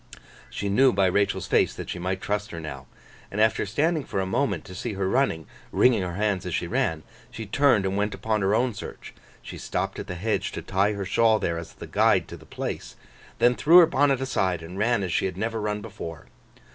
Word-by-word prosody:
She 100 - -4
knew 130 +7 +4
by 100 -3 +2
Rachael's 100 +2 +1
face - - +2
that - - -7
she 90 - -5
might 95 +1 -2
trust 105 +1 -2
her 85 - -7
now. 65 -5 -8 0.4
And 105 - -5
after 110 -1 +2
standing 155 - +1
for 100 - -3
a 95 - 0
moment 100 - -1
to 95 - -10
see 105 +5 -4
her 95 -1 -1
running, 95 - +1 0.3
wringing 125 -5 +4
her 90 -2 -4
hands 100 -2 0
as 90 - -2
she - - -1
ran, 80 -2 -1 0.3
she 110 - -7
turned 115 -2 +3
and 95 0 -1
went 105 +1 -1
upon 110 -1 -1
her 95 +2 +2
own 125 +1 +1
search; - - -9 0.3
she - - -8
stopped - - -3
at - - -6
the 90 - -5
hedge 105 +5 -1
to - - -5
tie 100 +3 +1
her 100 -1 -4
shawl 110 +3 +3
there 85 -5 -2
as 85 - -10
a - - -6
guide - - +2
to - - -7
the - - -15
place, - - -5 0.4
then 120 - +4
threw 160 +7 +5
her 175 - +10
bonnet 140 -3 +2
aside, 95 -10 0
and 90 +4 -8
ran 115 -1 +2
as 90 -3 -2
she - - +1
had 95 -2 -3
never 110 +2 -2
run 105 0 -2
before. 100 -7 -8
100 Hz, 230 wpm, -25 LUFS, 95-115 Hz, 0.4 s, her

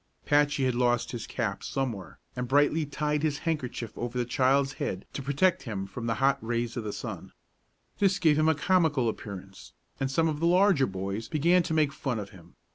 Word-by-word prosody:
Patchy 145 -1 +3
had 130 - +1
lost 120 -1 +1
his 120 -2 -5
cap 110 -6 -3
somewhere, 100 - -4 0.2
and 125 0 -3
Brightly 145 +3 +3
tied 150 +1 -1
his 150 -2 0
handkerchief 125 -8 -3
over 120 +1 -4
the 120 - 0
child's 135 +2 +2
head 95 0 -3
to - - -4
protect 145 +7 +2
him 100 -6 -4
from 115 +4 -6
the 115 - 0
hot 135 +4 +2
rays 120 0 -2
of 120 - -3
the 105 - -3
sun. - - -7 0.7
It 195 -1 +3
gave 155 -4 +4
him 155 +1 +4
a 160 - +3
comical 155 -6 +2
appearance, 95 -3 -7 0.3
and 135 - 0
some 160 +4 +2
of 150 -2 -2
the 165 - +2
larger 180 -5 +4
boys 100 +4 -4
began 170 +4 +3
to 165 -1 -2
make 150 -3 +2
fun 130 -4 -2
of 100 -2 -6
him. 90 -2 -16
135 Hz, 200 wpm, -28 LUFS, 115-155 Hz, 0.7 s, gave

